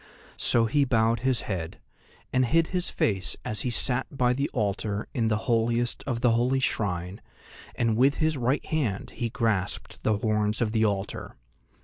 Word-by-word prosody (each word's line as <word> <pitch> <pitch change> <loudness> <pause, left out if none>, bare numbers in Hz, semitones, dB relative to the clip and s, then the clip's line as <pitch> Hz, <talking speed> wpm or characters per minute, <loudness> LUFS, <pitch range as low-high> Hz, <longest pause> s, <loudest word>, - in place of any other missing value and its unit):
So 115 -1 +3
he 140 +6 +2
bowed 115 -3 +2
his 125 -1 +1
head, 90 -5 -5 0.5
and 130 - +3
hid 165 +5 +2
his 180 -1 -1
face 95 -4 -1
as 105 -2 -1
he 125 - -1
sat 125 +2 +2
by 125 -3 +1
the 140 +3 -1
altar 105 -2 -2
in 115 -2 +1
the 110 -1 +1
holiest 120 0 +1
of 120 -3 -2
the 125 - +4
holy 125 +3 +2
shrine, 95 -5 -2 0.5
and 115 -2 +1
with 135 +5 +4
his 155 0 +1
right 130 +2 0
hand 125 -11 -2
he 120 - -3
grasped 110 -5 -2
the 110 -1 +1
horns 105 0 +1
of 115 -3 0
the 110 0 +2
altar. 100 -1 -3
115 Hz, 170 wpm, -27 LUFS, 105-125 Hz, 0.5 s, the